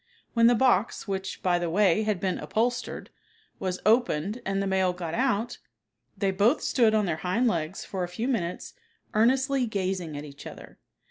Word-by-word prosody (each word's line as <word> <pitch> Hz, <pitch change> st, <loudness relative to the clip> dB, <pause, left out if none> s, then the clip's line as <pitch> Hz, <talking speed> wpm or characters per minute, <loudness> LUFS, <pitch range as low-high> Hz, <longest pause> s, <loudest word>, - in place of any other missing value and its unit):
When 230 Hz, -1 st, +5 dB
the 240 Hz, -, +5 dB
box, 235 Hz, -4 st, +2 dB
which, 190 Hz, -1 st, -4 dB
by 175 Hz, -1 st, +2 dB
the 175 Hz, -1 st, -2 dB
way, 195 Hz, +2 st, +3 dB
had 210 Hz, -3 st, 0 dB
been 185 Hz, -1 st, -1 dB
upholstered, 240 Hz, +2 st, -2 dB, 0.5 s
was 185 Hz, -1 st, -2 dB
opened 215 Hz, -2 st, +2 dB
and 195 Hz, 0 st, 0 dB
the 195 Hz, -, 0 dB
male 190 Hz, -1 st, +1 dB
got 170 Hz, -2 st, -5 dB
out, 240 Hz, -1 st, 0 dB, 0.6 s
they 195 Hz, -2 st, +1 dB
both 205 Hz, +9 st, +2 dB
stood 225 Hz, -5 st, +3 dB
on 210 Hz, -1 st, +2 dB
their 170 Hz, -4 st, -1 dB
hind 195 Hz, +9 st, 0 dB
legs 170 Hz, -3 st, -2 dB
for 190 Hz, -2 st, -3 dB
a -, -, -2 dB
few 200 Hz, +8 st, -4 dB
minutes 180 Hz, -10 st, -2 dB, 0.4 s
earnestly 260 Hz, +3 st, +2 dB
gazing 185 Hz, -6 st, -2 dB
at 145 Hz, -, -6 dB
each 140 Hz, -1 st, -10 dB
other. -, -, -12 dB
195 Hz, 180 wpm, -27 LUFS, 180-230 Hz, 0.6 s, When